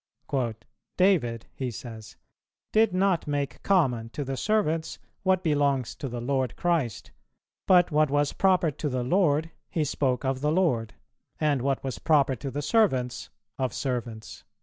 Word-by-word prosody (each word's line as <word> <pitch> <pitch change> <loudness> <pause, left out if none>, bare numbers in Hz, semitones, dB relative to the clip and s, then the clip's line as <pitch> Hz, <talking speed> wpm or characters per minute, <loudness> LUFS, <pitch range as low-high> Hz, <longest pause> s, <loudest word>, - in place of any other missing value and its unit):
"David," 155 - +2
he 130 -2 -3
says, 110 0 -9 0.6
"did 220 -1 +4
not 185 -3 +1
make 145 -2 -2
common 130 -12 +2
to 145 +6 -4
the 135 0 -3
servants 165 -3 0 0.2
what 185 -1 +2
belongs 140 -5 +1
to 135 - -5
the 120 0 -5
Lord[289:1] 130 0 -1
Christ, 165 - -1 0.6
but 180 -2 +5
what 155 0 +3
was 145 0 +1
proper 185 -4 +3
to 150 +2 -3
the 125 -2 -1
Lord 160 +1 +2 0.2
he 160 - 0
spoke 135 -2 -1
of 130 0 -1
the 150 +1 +1
Lord, 150 -11 +1 0.4
and 150 -4 +1
what 135 +1 -1
was 135 -1 -4
proper 140 -4 +3
to 135 +5 -5
the 145 +2 -4
servants, 135 - +1 0.3
of 130 -3 -1
servants." 120 -4 -4
145 Hz, 150 wpm, -27 LUFS, 125-170 Hz, 0.6 s, but